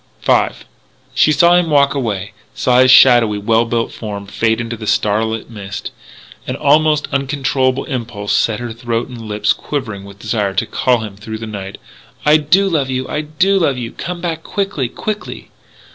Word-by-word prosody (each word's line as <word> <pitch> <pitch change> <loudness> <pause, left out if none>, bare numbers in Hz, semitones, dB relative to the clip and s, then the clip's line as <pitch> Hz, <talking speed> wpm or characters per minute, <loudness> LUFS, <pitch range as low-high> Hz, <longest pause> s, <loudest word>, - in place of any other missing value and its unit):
V - - +4 0.7
She 155 - +4
saw 170 +4 +5
him 175 -2 +3
walk 140 -2 +4
away 105 -7 -3 0.2
saw 125 -1 +2
his 130 0 +5
shadowy, 120 -5 +6
well 115 +3 +2
built 115 0 -1
form 100 -2 -6
fade 110 +3 0
into 120 0 -4
the 110 -1 -8
starlit 110 +2 0
mist. 105 -3 -7 0.6
An - - -2
almost 150 +1 +3
uncontrollable 135 -1 0
impulse 115 -6 -4
set 110 -2 +1
her 120 -2 -5
throat 115 0 -3
and 120 -2 -9
lips 105 -1 0
quivering 115 -9 -5
with 100 0 -12
desire 105 -2 -2
to - - +1
call 125 -3 +1
to - - -4
him 100 -2 -10
through 110 +1 -7
the 115 - -7
night, 100 -3 -7 0.5
"I 150 +1 +6
do 175 +6 +3
love 150 -7 0
you! 130 0 -2
I 150 - -2
do 185 +6 +1
love 140 -7 +1
you! 120 -2 -5
Come 175 0 -6
back 165 -2 -3
quickly, 195 -10 -2
quickly! 210 - -6
120 Hz, 180 wpm, -17 LUFS, 110-150 Hz, 0.7 s, shadowy